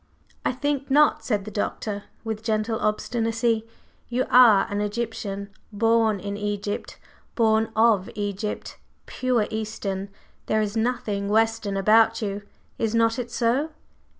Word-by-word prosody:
"I - - +1
think 280 +1 -2
not," 295 +2 +4
said 205 -4 -1
the 215 - -7
Doctor, 205 0 -3 0.2
with 220 -1 -4
gentle 220 0 -1
obstinacy. 225 +1 0 0.4
"You 250 +1 0
are 235 -6 +7
an 205 0 -2
Egyptian. 210 -2 -3 0.2
Born 225 0 +2
in 200 +1 -4
Egypt; 205 0 -4 0.4
born 220 -1 +3
of 220 -4 +3
Egypt. 205 0 -4 0.3
Pure 250 -4 0
Eastern! 205 -3 -4 0.4
There 215 - +2
is 210 0 -1
nothing 220 -4 -1
Western 220 -2 +1
about 225 +3 +4
you. 205 -2 -3 0.4
Is 225 0 0
not 230 +1 +2
it 240 -1 -4
so?" 245 +6 +1
220 Hz, 130 wpm, -24 LUFS, 205-230 Hz, 0.4 s, are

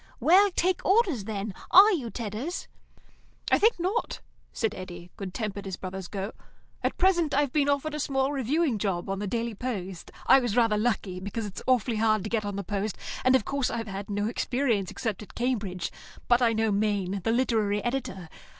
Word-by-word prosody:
"Well, 385 +5 +6
take 370 +1 +1
Orders, 375 - +2
then. 205 -1 -4 0.2
Are 400 +4 +9
you, 280 - -1
Tedders?" 230 - -4 0.8
"I - - +5
think 450 +3 +4
not," 380 +7 -1 0.3
said 225 -2 -1
Eddy, 175 -3 -9
good 195 -2 -6
tempered 200 -1 -4
as 190 - -4
brothers 190 -1 -6
go. 195 +2 -4 0.5
"At - - -1
present 350 -6 +3
I've 285 -2 +2
been 285 -2 +2
offered 285 +2 0
a 300 - -3
small 270 -1 0
reviewing 280 -1 0
job 195 -2 -1
on 195 - -2
the 205 - -3
Daily 230 +2 -2
Post. 195 -6 -5 0.2
I 270 - +7
was 240 -3 -1
rather 230 -3 +4
lucky, 210 -4 -1
because 205 +4 -4
it's 200 - -7
awfully 245 -3 +2
hard 215 -2 +2
to 215 - -5
get 220 -3 0
on 205 -1 -3
the 200 - -3
Post, 205 +2 -3 0.3
and, 255 0 +5
of 255 - +2
course, 280 -2 0
I've 225 -1 -3
had 200 0 -6
no 205 +1 -1
experience 235 -4 0
except 220 -4 -3
at 210 - -12
Cambridge; 210 -8 -2 0.4
but 240 +1 +4
I 230 -2 +4
know 220 -1 +1
Maine, 200 -2 0
the 225 - +1
literary 220 -4 +1
editor. 240 -8 -3
220 Hz, 195 wpm, -27 LUFS, 200-265 Hz, 0.8 s, Are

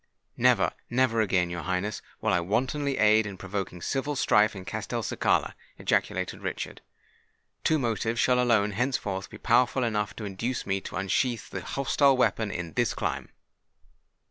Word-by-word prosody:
"Never—never 120 -2 +2
again, 90 -4 +1
your 85 0 -4
Highness, 95 +4 -2 0.2
will - - +1
I 90 - +4
wantonly 130 - -1
aid 110 0 +4
in 100 -2 -7
provoking 95 -2 -5
civil 140 +2 -1
strife 105 -4 +3
in 95 -1 -8
Castelcicala!" - - -1 0.2
ejaculated - - -1
Richard. - - -5 0.8
"Two 160 - +3
motives 115 -2 -1
shall 125 -1 +3
alone 110 -4 +3
henceforth 100 -4 -2
be - - -10
powerful 125 +2 +3
enough 105 -3 -1
to 110 - -6
induce 115 +6 -3
me 95 0 -1
to - - -8
unsheath 110 +5 -1
the 95 - -4
hostile 135 +5 +2
weapon 115 -3 +1
in 85 -4 -5
this - - +1
clime." - - -3
110 Hz, 145 wpm, -27 LUFS, 95-125 Hz, 0.8 s, I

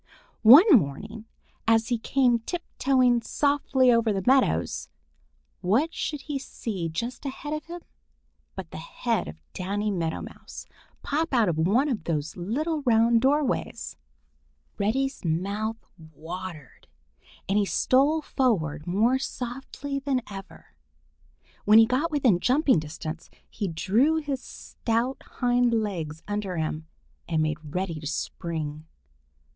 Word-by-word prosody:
One 270 - +9
morning, 210 +10 -6 0.4
as 225 +1 +3
he 240 -2 0
came 245 -1 +2
tiptoeing 255 -4 +1
softly 270 0 +2
over 230 -2 +3
the 195 -2 -2
meadows, 265 +1 +2 0.7
what 235 - +1
should 295 -2 -3
he 285 0 -4
see 200 -9 -5
just 235 +10 -4
ahead 295 +2 -5
of 305 -1 -4
him 345 +1 -7 0.7
but - - -7
the - - -7
head - - -2
of 80 +1 -10
Danny 205 +3 -2
Meadow 165 -4 -2
Mouse - - -10 0.4
pop 320 +3 -1
out 225 -6 +4
of 160 -2 -1
one 215 - +3
of 220 - -2
those 155 -2 -2
little 290 - -2
round 230 -2 +4
doorways. 275 0 0 0.8
Reddy's 270 +7 0
mouth 200 +7 -1 0.2
watered, 160 0 -9 0.6
and 200 +2 +2
he 205 - +2
stole 285 +9 +2
forward 160 - 0
more 225 +9 +2
softly 270 +2 -5
than 270 -3 -1
ever. 195 -1 -11 0.9
When 210 +1 +6
he 225 - +8
got 260 +8 0
within 260 - +3
jumping 260 - +3
distance, 155 +1 -7 0.2
he 205 - -4
drew 210 - +2
his 290 -5 -2
stout 235 +2 -3
hind 245 -1 +1
legs 170 -8 -3
under 205 -3 -3
him 155 0 -3 0.4
and 160 -2 +1
made 155 -1 -3
ready 180 -4 -2
to 150 - -6
spring. 155 -1 -4
225 Hz, 130 wpm, -26 LUFS, 170-265 Hz, 0.9 s, One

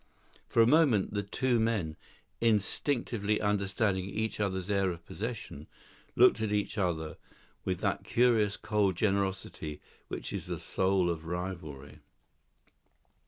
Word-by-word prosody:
For 115 - +4
a - - +5
moment 130 - +4
the 105 - 0
two 120 +4 0
men, 105 -9 0 0.4
instinctively 110 0 +1
understanding 100 -1 0
each 110 +3 -3
other's 95 -3 -1
air 100 -2 +2
of 85 -1 -6
possession, 105 - -6 0.5
looked 110 - +6
at 110 -1 0
each 105 -1 0
other 85 -6 -1 0.5
with 90 -1 -1
that - - 0
curious 115 -4 +3
cold 105 -4 +1
generosity 95 -6 -1 0.3
which - - -5
is - - -4
the - - -3
soul 95 -1 +1
of 85 -2 -2
rivalry. 85 -5 -6
100 Hz, 125 wpm, -31 LUFS, 90-110 Hz, 0.5 s, looked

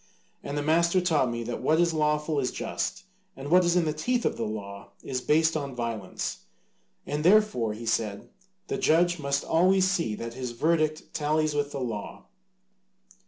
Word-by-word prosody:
And 140 +1 -4
the 145 - -1
master 170 +4 +3
taught 160 -8 +2
me 120 0 -3
that 120 +1 -5
what 160 +1 +2
is 170 -1 +3
lawful 150 -1 +1
is 125 -2 0
just - - -4 0.3
and 140 +3 -7
what 180 +1 +6
is 175 0 +2
in 175 -2 +3
the 155 - 0
teeth 240 +11 -1
of - - -1
law 100 -3 -5
is 130 -2 -3
based 160 +4 +2
on 140 -4 -3
violence, 115 -5 -4 0.7
and 150 +1 -3
therefore, 180 - +3
he 115 +2 -8
said, 110 -3 -1 0.4
the - - -3
judge 175 -1 +3
must 140 -1 -1
always 185 +3 +3
see 170 - 0
that 115 +2 -6
his 125 -1 -5
verdict 155 +3 0
tallies 155 0 0
with 145 -1 -1
the 140 - -4
law. 115 -5 -5
150 Hz, 175 wpm, -27 LUFS, 120-165 Hz, 0.7 s, what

